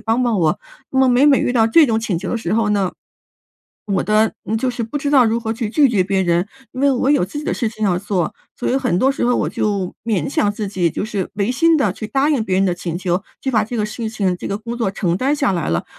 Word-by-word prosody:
帮 225 +3 +1
帮 235 -4 +1
我？ 160 -3 +1 0.3
那 265 - -1
么 265 - +5
每 250 +2 +4
每 280 -2 +6
遇 - - 0
到 225 -3 +3
这 305 +7 +5
种 225 -3 +1
请 205 -6 -1
求 185 - -5
的 - - -1
时 225 - -3
候 220 -2 +1
呢， 195 -3 0 0.9
我 200 -2 0
的 215 +1 +2
呃， 215 +3 -1
就 255 +3 -1
是 245 -1 -4
不 230 +6 -3
知 285 0 -2
道 260 -3 +6
如 225 0 +1
何 225 -1 -2
去 225 -1 -3
拒 285 +2 +4
绝 210 -6 +2
别 190 0 0
人， 175 +1 +1 0.3
因 255 - -6
为 280 0 +4
我 260 0 0
有 290 -11 +3
自 200 +11 -7
己 295 - -6
的 - - -1
事 235 - -1
情 215 -1 -4
要 180 -3 +2
做， 185 -4 -2 0.2
所 - - -3
以 260 - +2
很 250 -9 0
多 265 - +3
时 275 - -2
候 245 0 +2
我 - - 0
就 200 -4 -2
勉 200 -9 -1
强 205 - +2
自 205 -1 -4
己， 185 -3 0
就 - - -3
是 205 -4 -3
违 205 +2 0
心 325 +5 +3
地 220 -10 +1
去 215 - -6
答 275 +5 +1
应 265 -7 +1
别 190 -3 -1
人 195 - +3
的 185 - +1
请 170 -1 -4
求， 180 0 -1 0.2
去 265 - -2
把 220 -4 +2
这 235 +3 -5
个 210 - 0
事 220 +1 -4
情、 200 -5 -1
这 - - -7
个 200 - -2
工 235 +3 -6
作 230 -5 0
承 180 -3 -1
担 270 +7 +1
下 280 -5 +1
来 170 -4 -2
了。 80 0 -1
220 Hz, 310 characters per minute, -19 LUFS, 195-250 Hz, 0.9 s, 每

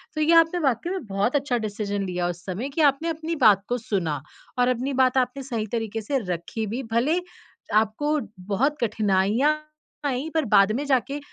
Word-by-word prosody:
तो 310 - -1
ये 325 +2 +4
आपने 330 +2 +5
वाकई 255 +7 0
में 375 -8 -4
बहुत 200 +6 0
अच्छा 275 -3 +1
डिसीज़न 205 -1 -3
लिया 180 -1 -1
उस 175 0 -5
समय 200 +8 -4
कि 305 +3 -1
आपने 315 +5 -5
अपनी 320 +1 -3
बात 200 -2 +6
को 245 - 0
सुना 170 - -2 0.4
और 245 - +4
अपनी 255 +2 0
बात 255 +1 +2
आपने 255 +2 0
सही 230 -5 -3
तरीके 225 -1 -2
से 270 +6 -1 0.2
रखी 195 +6 -4
भी, 240 +6 -3
भले 240 +9 +1 0.5
आपको 220 +9 +2 0.3
बहुत 280 +8 +1
कठिनाइयाँ 215 +5 +2 0.5
आई 270 +3 -1
पर 320 -3 +1
बाद 200 +1 +6
में 280 - -1
जाके 275 +1 0
245 Hz, 185 wpm, -24 LUFS, 205-285 Hz, 0.5 s, बात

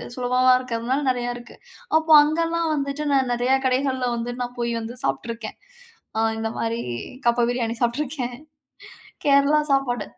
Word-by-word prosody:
சுலபமாக 255 0 +3
இருக்கிறதுனால 250 +3 -2
நிறையா 245 -1 -2
இருக்கு. 240 -1 -13 0.4
அப்போ 320 0 +3
அங்கலாம் 330 +2 0
வந்துட்டு 280 +1 -3
நான் 265 -2 +2
நிறையா 250 +2 +2
கடைகள்ல 260 -1 0
வந்து 235 +1 -4
நான் 245 0 -5
போயி 235 0 -1
வந்து 230 +2 -7
சாப்ட்டுருக்கேன். 230 -1 -4 0.6
அ - - +1 0.2
இந்த 225 0 -2
மாரி 230 +1 -1 0.5
கப்ப 235 0 +3
பிரியாணி 235 -2 -1
சாப்ட்டுருக்கேன். 250 0 -2 0.9
கேரளா 280 +1 +5
சாப்பாடு. 245 -5 0
250 Hz, 135 wpm, -23 LUFS, 235-275 Hz, 0.9 s, கேரளா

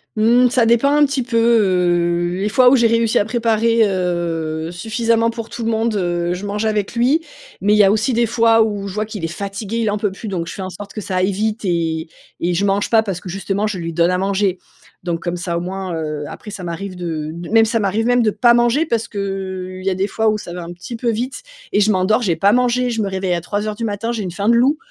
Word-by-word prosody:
Mmh, 240 +3 +4
ça 240 -2 +2
dépend 235 +5 +3
un 295 0 +5
petit 275 -1 -1
peu, 235 -1 -2
heu, 175 -6 +2
les 210 - 0
fois 250 +3 +5
où 265 - +5
j'ai 235 -3 +4
réussi 230 -1 +2
à 205 - +1
préparer, 230 0 +1
heu, 170 -3 -2
suffisamment 230 +4 0
pour 230 -1 -6
tout 235 - -6
le 225 - 0
monde, 225 0 0
heu, 175 -2 -1
je 190 +3 -5
mangeais 210 +2 -2
avec 215 +1 -1
lui. 270 +8 +2 0.4
Mais 205 +2 +3
il - - +4
y 210 - +7
a 195 - +5
aussi 220 +5 +1
des 235 +1 +2
fois, 225 0 +4
où 205 -2 -3
je 190 - -6
vois 215 0 -1
qu'il 210 -5 -7
est - - 0
fatigué, 200 +5 -5
il 225 -2 +1
en 210 - -1
peut 205 -2 0
plus, 215 +3 -8
donc 175 -4 -3
je - - -6
fais 195 - -6
en 185 - -4
sorte 200 +2 -9
que 215 - -5
ça 185 -1 -3
aille 185 +2 +2
vite 215 +3 -2
et 165 -3 -1 0.3
et 175 +1 0
je 200 +3 +1
mange 200 +1 +1
pas, 225 -1 +4
parce 195 -5 -4
que 180 - -9
justement, 195 +3 -2
je 205 -3 -3
lui 165 -1 -4
donne 170 +2 +2
à 180 - +1
manger. 195 0 0 0.5
Donc, 170 -1 -2
comme 175 0 -2
ça, 170 -1 -3
au 170 - -2
moins, 185 -1 -4
heu, 155 -2 -4
après 210 - -9
ça 190 -3 -7
m'arrive 185 +2 -5
de 160 -3 -4
d 170 +1 -8
même 225 0 +6
ça 225 +1 +1
m'arrive 210 +3 0
même 245 0 +3
de 215 - +2
pas 240 +2 +4
manger, 240 +6 +3
parce 230 -6 -1
que, 205 - -10
heu, 190 -1 -4
il 185 - -10
y 195 - +2
a 185 - -1
des 190 +2 0
fois 220 +2 -1
où 215 - 0
ça 175 - -8
va 175 0 -6
un 170 +1 -7
petit 230 +7 -8
peu 235 0 -1
vite 245 - -3 0.3
et - - +2
je 210 +1 +3
m'endors, 190 +5 +2
j'ai 175 -5 +1
pas 195 +5 +3
mangé, 250 +1 +2
je 225 -2 -1
me 200 - -1
réveille 190 -2 -1
à 170 - 0
03:00 210 +4 -3
du 230 +2 -3
matin, 220 +2 -2
j'ai 220 -3 -3
une 180 - -4
faim 200 +5 -1
de 235 - +5
loup, 270 +6 +3
205 Hz, 275 wpm, -19 LUFS, 180-230 Hz, 0.5 s, y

